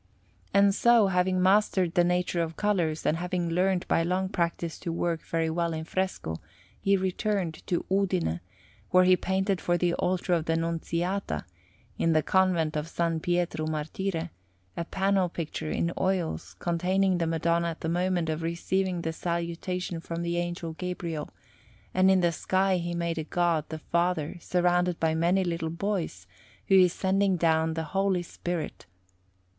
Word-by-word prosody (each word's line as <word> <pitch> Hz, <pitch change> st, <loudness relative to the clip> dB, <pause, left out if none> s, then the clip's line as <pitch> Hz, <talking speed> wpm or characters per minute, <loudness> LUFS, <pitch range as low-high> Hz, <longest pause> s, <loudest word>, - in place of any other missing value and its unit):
And 200 Hz, 0 st, +5 dB
so, 235 Hz, +1 st, +5 dB
having 180 Hz, 0 st, +2 dB
mastered 190 Hz, -3 st, +3 dB
the 175 Hz, -, +4 dB
nature 180 Hz, 0 st, +1 dB
of 165 Hz, -1 st, -3 dB
colours, 175 Hz, -7 st, 0 dB
and 155 Hz, -, +2 dB
having 175 Hz, -1 st, -2 dB
learnt 180 Hz, +1 st, +1 dB
by -, -, +3 dB
long 185 Hz, +3 st, 0 dB
practice 170 Hz, -2 st, -2 dB
to 170 Hz, -, -4 dB
work 170 Hz, 0 st, -1 dB
very 165 Hz, -1 st, -1 dB
well 170 Hz, +1 st, -1 dB
in 160 Hz, 0 st, -3 dB
fresco, 175 Hz, -, -2 dB, 0.4 s
he 195 Hz, 0 st, +3 dB
returned 190 Hz, -2 st, -1 dB
to 175 Hz, -, -1 dB
Udine, 185 Hz, -, +1 dB, 0.5 s
where 185 Hz, 0 st, +5 dB
he 185 Hz, 0 st, +6 dB
painted 190 Hz, +1 st, 0 dB
for 175 Hz, 0 st, +1 dB
the 175 Hz, 0 st, +1 dB
altar 180 Hz, +1 st, 0 dB
of 165 Hz, -2 st, +1 dB
the 165 Hz, -, +1 dB
Nunziata, 170 Hz, -, -2 dB, 0.5 s
in 165 Hz, -, +3 dB
the 155 Hz, -1 st, +3 dB
Convent 180 Hz, -5 st, +2 dB
of 155 Hz, +2 st, -3 dB
S. 165 Hz, -1 st, +1 dB
Pietro 175 Hz, -2 st, 0 dB
Martire, 160 Hz, +2 st, -3 dB, 0.4 s
a 170 Hz, -, -3 dB
panel 190 Hz, 0 st, +1 dB
picture 160 Hz, -2 st, -4 dB
in 170 Hz, +2 st, -1 dB
oils 185 Hz, -3 st, -1 dB
containing 185 Hz, +2 st, +1 dB
the 165 Hz, -, 0 dB
Madonna 170 Hz, +1 st, +1 dB
at 165 Hz, -1 st, -5 dB
the -, -, -2 dB
moment 175 Hz, 0 st, 0 dB
of 160 Hz, 0 st, -2 dB
receiving 175 Hz, +2 st, -1 dB
the 160 Hz, -, -2 dB
Salutation 170 Hz, +1 st, -3 dB
from 165 Hz, +1 st, -5 dB
the 170 Hz, 0 st, -1 dB
Angel 175 Hz, -1 st, -3 dB
Gabriel; 170 Hz, -3 st, -4 dB, 0.6 s
and 185 Hz, +1 st, +4 dB
in 190 Hz, -1 st, +4 dB
the 175 Hz, -1 st, +3 dB
sky 190 Hz, +3 st, +1 dB
he 175 Hz, 0 st, -3 dB
made 170 Hz, -1 st, -1 dB
a -, -, -2 dB
God 170 Hz, -1 st, +1 dB
the 160 Hz, -, -4 dB
Father 170 Hz, 0 st, -1 dB
surrounded 180 Hz, 0 st, +1 dB
by 160 Hz, -1 st, +2 dB
many 175 Hz, +4 st, +2 dB
little 170 Hz, -2 st, -2 dB
boys, 170 Hz, -, -3 dB, 0.4 s
who 195 Hz, -, +6 dB
is 180 Hz, -1 st, +5 dB
sending 190 Hz, +1 st, +1 dB
down 160 Hz, -1 st, +2 dB
the 160 Hz, -, -2 dB
Holy 195 Hz, -2 st, +1 dB
Spirit. 175 Hz, -, -5 dB
175 Hz, 165 wpm, -28 LUFS, 165-185 Hz, 0.6 s, he